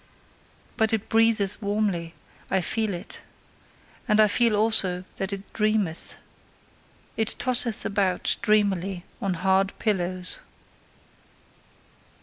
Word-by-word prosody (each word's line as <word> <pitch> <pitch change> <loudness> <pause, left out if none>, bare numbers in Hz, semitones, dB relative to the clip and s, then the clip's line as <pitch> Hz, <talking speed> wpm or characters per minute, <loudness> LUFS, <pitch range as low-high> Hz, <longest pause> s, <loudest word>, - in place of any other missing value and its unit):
But 220 -1 +2
it 220 -1 -2
breatheth 225 -3 +2
warmly 200 -5 -2 0.3
I 190 0 +1
feel 220 +3 +1
it. 180 +3 -8 0.9
And 215 -2 +2
I 215 - +7
feel 230 +1 +3
also 205 -4 +3
that 195 +1 -3
it 200 0 -7
dreameth. 215 -6 -1 1.0
It 220 -1 +1
tosseth 250 -3 +1
about 195 -3 0
dreamily 195 -3 0 0.2
on 195 -2 -1
hard 190 +2 +1
pillows. 185 -3 0
200 Hz, 105 wpm, -25 LUFS, 185-220 Hz, 1.0 s, I